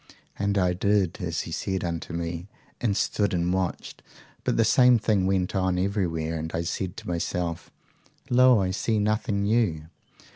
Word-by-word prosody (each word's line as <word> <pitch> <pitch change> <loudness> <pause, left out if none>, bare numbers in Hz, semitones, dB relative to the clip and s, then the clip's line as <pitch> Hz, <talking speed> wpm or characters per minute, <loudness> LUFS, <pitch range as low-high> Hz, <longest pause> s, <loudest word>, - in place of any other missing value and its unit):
"'And 100 0 0
I 90 -2 +2
did 95 -1 +1
as 85 -2 -2
he - - -7
said 95 +3 -2
unto 85 0 -4
me, 85 +1 -4 0.3
and 105 -4 0
stood 100 -3 0
and 90 +1 0
watched. 95 -2 -3 0.4
But - - 0
the 115 - +4
same 125 +2 +5
thing 105 -4 +1
went 95 0 0
on 95 -1 +1
everywhere; 85 -5 -1
and 80 +1 -5
I 85 - -1
said 90 +1 -4
to - - -9
myself, 85 -1 -3 0.6
Lo, 125 -1 +5
I 90 - -1
see 110 +3 0
nothing 105 0 0
new! 100 -8 +1
95 Hz, 170 wpm, -26 LUFS, 85-105 Hz, 0.6 s, same